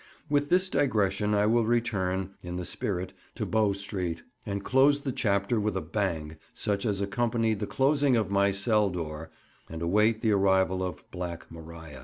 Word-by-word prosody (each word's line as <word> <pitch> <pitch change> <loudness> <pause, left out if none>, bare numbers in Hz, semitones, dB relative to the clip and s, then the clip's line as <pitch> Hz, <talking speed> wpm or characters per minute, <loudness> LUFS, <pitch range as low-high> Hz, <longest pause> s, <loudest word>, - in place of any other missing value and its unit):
With 145 0 +2
this 185 +1 +3
digression 105 - +1
I 105 0 +3
will 115 +2 +3
return 95 -6 0
(in 90 0 -6
the 90 0 -4
spirit) 90 0 -3 0.2
to - - -2
Bow 110 -2 +2
Street, 95 -4 -4 0.2
and 100 0 -3
close 140 +2 +4
the 140 - -2
chapter 100 0 +1
with 105 -2 -1
a - - -1
bang 80 -3 -3 0.2
such 100 +2 -1
as 100 -2 -1
accompanied 115 +1 0
the 105 - -3
closing 140 -1 +2
of 105 -3 -1
my 100 0 +3
cell 100 +1 +2
door, 80 -3 -5 0.4
and 80 - -6
await 105 +5 +2
the 110 - +2
arrival 95 -2 +3
of 90 -3 -5
"Black 90 -2 -6
Maria." 80 -3 -10
100 Hz, 175 wpm, -28 LUFS, 90-115 Hz, 0.4 s, close